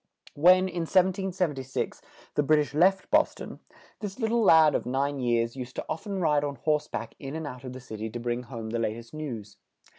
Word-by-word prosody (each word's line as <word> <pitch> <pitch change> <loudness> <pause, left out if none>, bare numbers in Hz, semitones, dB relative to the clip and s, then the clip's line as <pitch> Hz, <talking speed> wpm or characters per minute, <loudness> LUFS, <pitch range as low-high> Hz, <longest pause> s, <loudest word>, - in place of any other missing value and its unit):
When, 185 +5 +5
in 170 -2 -3
1776, 180 - 0 0.3
the - - +2
Brit 155 +2 +4
ish 150 -1 -1
left 190 +5 +3
Bos - - +4
ton, - - -9 0.4
this 205 -2 -6
lit 225 -3 0
tle 235 +1 +2
lad 160 -7 +6
of - - -1
nine 140 +2 0
years 120 -1 +1
used 130 -1 -7
to - - -4
oft 160 +7 -5
en 200 -2 -2
ride 150 -4 +2
on 145 -1 -2
horse 150 +3 0
back 115 - -5
in 135 +2 -6
and 160 -1 -4
out 125 -3 -7
of 130 -1 -7
the 130 - -8
city 110 -3 -6
to 120 - -6
bring 120 +1 -2
home 115 -3 -7
the 115 - -1
lat 110 -2 0
est 115 +3 -11
news. 120 -10 -6
145 Hz, 220 wpm, -27 LUFS, 120-175 Hz, 0.4 s, lad